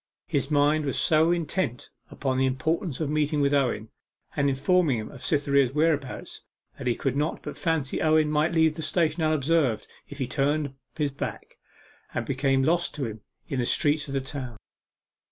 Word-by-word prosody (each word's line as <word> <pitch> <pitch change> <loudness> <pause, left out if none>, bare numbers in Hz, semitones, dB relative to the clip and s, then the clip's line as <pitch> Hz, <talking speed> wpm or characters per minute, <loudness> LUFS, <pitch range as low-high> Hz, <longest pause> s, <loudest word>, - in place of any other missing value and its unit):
His 140 -3 -1
mind 150 +1 +3
was 135 - -1
so 160 +1 +4
intent 170 -6 -2 0.2
upon 130 -2 -2
the 130 - +3
importance 155 +4 -1
of 155 - -1
meeting 150 0 +1
with 140 0 +2
Owen, 125 -6 +1 0.5
and 140 0 +2
informing 140 +1 +2
him 110 - -6
of 135 - -12
Cytherea's 140 -3 +2
whereabouts, 150 -3 -1 0.4
that 130 - -4
he 120 - +2
could 135 -3 -1
not 150 +3 -1
but - - -6
fancy 160 -6 -1
Owen 155 -1 +3
might 150 +2 +2
leave 160 -2 +3
the 160 - -6
station 165 +1 +1
unobserved 155 -6 +2 0.2
if 145 - -9
he 135 - -1
turned 145 +1 0 0.2
his 150 -2 0
back, 135 - -6 0.6
and 120 - -1
become 135 0 +1
lost 170 +3 +1
to 145 -3 -2
him 110 -2 -6 0.3
in 135 - -2
the 120 - +1
streets 150 0 +2
of 140 - -4
the 135 - +1
town. 130 -4 -6
145 Hz, 180 wpm, -26 LUFS, 135-155 Hz, 0.6 s, so